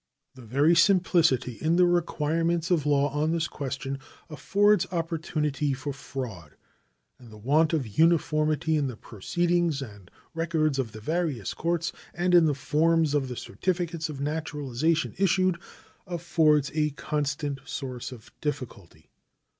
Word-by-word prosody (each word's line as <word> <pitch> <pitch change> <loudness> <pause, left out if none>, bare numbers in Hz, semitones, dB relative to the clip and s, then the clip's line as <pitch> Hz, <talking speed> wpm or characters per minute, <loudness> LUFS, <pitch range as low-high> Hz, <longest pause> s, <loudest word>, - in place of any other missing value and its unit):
The 130 - -13
very 140 +8 +3
simplicity 170 - +3
in 160 +2 +2
the 180 0 +5
requirements 170 0 0
of 155 -4 +2
law 145 0 +3
on 150 +2 +1
this 165 0 0
question 135 0 -5 0.3
affords 200 +4 +2
opportunity 155 -4 -1
for 140 +2 -5
fraud, 115 - -7 0.6
and 120 - -14
the 110 - -12
want 150 +8 +2
of 155 -6 0
uniformity 155 +3 +2
in 145 -2 0
the 125 -4 -6
proceedings 170 - -1
and 100 -8 -9 0.2
records 160 -4 0
of 115 -5 -2
the 110 - -9
various 155 - -2
courts 170 0 -1 0.2
and 180 +1 0
in 175 -2 +7
the 145 - +1
forms 155 +3 +2
of 140 -3 +1
the 125 -2 -6
certificates 170 -3 -2
of 145 -3 -6
naturalization 150 0 -1
issued 185 -2 +2 0.5
affords 160 -4 +2
a 150 -1 +1
constant 145 -1 -3
source 125 -2 -5
of 115 -4 -12
difficulty. 100 - -6
150 Hz, 140 wpm, -27 LUFS, 135-170 Hz, 0.6 s, in